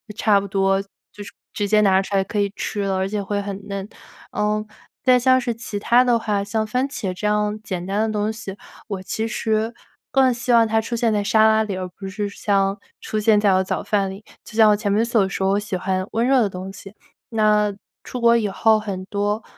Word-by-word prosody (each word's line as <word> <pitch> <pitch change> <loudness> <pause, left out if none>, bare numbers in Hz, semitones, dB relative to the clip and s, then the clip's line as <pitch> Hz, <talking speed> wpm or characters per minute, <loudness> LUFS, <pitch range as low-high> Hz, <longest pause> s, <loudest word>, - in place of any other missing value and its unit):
差 210 -2 +3
不 200 - -6
多 195 0 +1
就 200 +1 -14
是 - - -8 0.2
直 205 - -1
接 210 +1 +4
拿 190 -2 +4
出 195 +1 -4
来 195 - +3
可 205 +2 -3
以 200 0 +1
吃 205 - -3
了， 195 -1 0
而 190 0 0
且 205 +1 -2
会 200 +1 -2
很 200 0 -7
嫩。 200 -1 -4 0.5
嗯， 210 0 -1 0.4
再 255 -1 +5
像 255 +1 +4
是 240 -2 -2
其 225 -2 -6
它 235 +4 +4
的 240 -2 +3
话， 210 -3 -1
像 215 +2 -1
番 250 +5 -1
茄 200 -9 -4
这 210 +3 -3
样 210 0 0
简 185 -5 -5
单 200 +3 -1
的 - - -3
东 210 +1 0
西， 220 -3 -7 0.3
我 195 -3 -5
其 220 +4 -3
实 220 0 -1 0.4
更 260 -1 +4
希 240 +1 -1
望 230 -1 +6
它 220 0 +1
出 225 +2 -3
现 230 -1 +1
在 210 -1 +1
沙 215 +2 +4
拉 220 0 +3
里， 205 -3 -4
而 185 0 -4
不 195 +2 -9
是 205 +2 -3
像 200 0 0 0.2
出 215 - -3
现 215 0 +4
在 205 -2 +4
我 185 - +3
早 190 - -3
饭 200 -2 0
里， 195 +3 -9 0.2
就 215 - -12
像 220 -1 +6
我 - - +4
前 205 -1 -2
面 205 +3 +2
所 230 -4 +2
说， 190 0 -1
我 200 - +2
喜 205 -2 -4
欢 185 +1 -2
温 230 +2 +1
热 265 0 +4
的 210 - +1
东 185 +1 -7
西。 195 +1 -12 0.4
那 210 -1 +2 0.3
出 250 - -6
国 235 0 +5
以 215 - 0
后 220 +2 +3
很 200 -3 -5
多 205 +2 -2
210 Hz, 255 characters per minute, -21 LUFS, 195-220 Hz, 0.5 s, 望